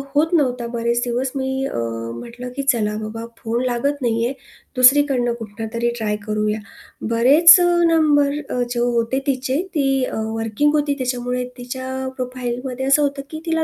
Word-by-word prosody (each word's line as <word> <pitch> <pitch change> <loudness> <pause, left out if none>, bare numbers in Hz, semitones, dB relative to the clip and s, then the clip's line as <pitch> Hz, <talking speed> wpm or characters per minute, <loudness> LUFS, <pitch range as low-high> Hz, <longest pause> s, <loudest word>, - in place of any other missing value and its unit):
होत 320 +4 +2
नव्हता 250 -7 +1
बरेच 235 0 -1
दिवस. 250 +2 -1
मी 265 0 -2
अ, - - -4 0.4
म्हटलं, 240 - -8
की 275 - -2
चला 225 -6 +1
बाबा 220 +1 -6
फोन 235 +2 -2
लागत 275 +4 -1
नाही 230 -1 0
आहे 250 - -1 0.4
दुसरीकडनं 255 -2 +4
कुठूनतरी 225 +2 -3
ट्राय 210 -2 -1
करूया. 215 0 -1 0.5
बरेच 275 +9 +7
अ, - - +3 0.2
नंबर 295 -3 +3 0.2
अ, 250 - -1
जे 240 -1 -2
होते 240 +1 0
तिचे 260 -1 0 0.2
ती 270 -3 +1
अ, - - -5 0.2
वर्किंग 225 +7 0
होती 295 -1 +1
त्याच्यामुळे 250 0 -2
तिच्या 260 +1 -5
प्रोफाईलमध्ये 250 +1 -4
असं 275 +2 +4
होतं 280 -1 -1
की 315 - -5
तिला 325 -1 +1
250 Hz, 160 wpm, -20 LUFS, 235-275 Hz, 0.5 s, बरेच